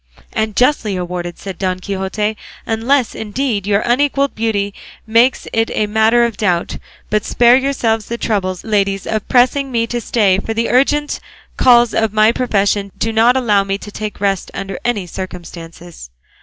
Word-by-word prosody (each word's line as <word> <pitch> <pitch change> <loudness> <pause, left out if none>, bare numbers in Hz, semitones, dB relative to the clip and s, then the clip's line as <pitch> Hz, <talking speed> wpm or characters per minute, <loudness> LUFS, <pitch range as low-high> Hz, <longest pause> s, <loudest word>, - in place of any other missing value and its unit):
"And 220 -1 -1
justly 245 -6 +2
awarded," 175 -1 -4
said 195 -3 -8
Don 185 -1 -1
Quixote, 200 +3 -2 0.3
"unless, 235 +3 +1
indeed, 220 -2 -3
your 205 0 +2
unequalled 280 +3 +1
beauty 205 -3 -1 0.3
makes 230 +3 +2
it 225 0 +1
a 215 - +1
matter 220 +3 +3
of 230 -3 -4
doubt. 180 -5 0 0.3
But 210 -1 +1
spare 240 0 +4
yourselves 245 -5 0
the 235 - -4
trouble, 190 -5 -1
ladies, 200 -3 0
of 215 -2 -3
pressing 260 +2 +2
me 230 -2 +1
to 240 +1 -3
stay, 200 -5 +2
for 225 +2 -4
the 230 +1 0
urgent 290 +3 +1 0.4
calls 240 -2 +5
of 220 -2 0
my 215 +1 +5
profession 205 -5 0
do 225 0 -1
not 235 +3 +4
allow 210 -6 +2
me 195 0 -2
to 205 - -10
take 215 0 -6
rest 195 -2 -1
under 195 -1 -5
any 225 -6 -1
circumstances." 170 - -9
215 Hz, 165 wpm, -17 LUFS, 195-240 Hz, 0.4 s, calls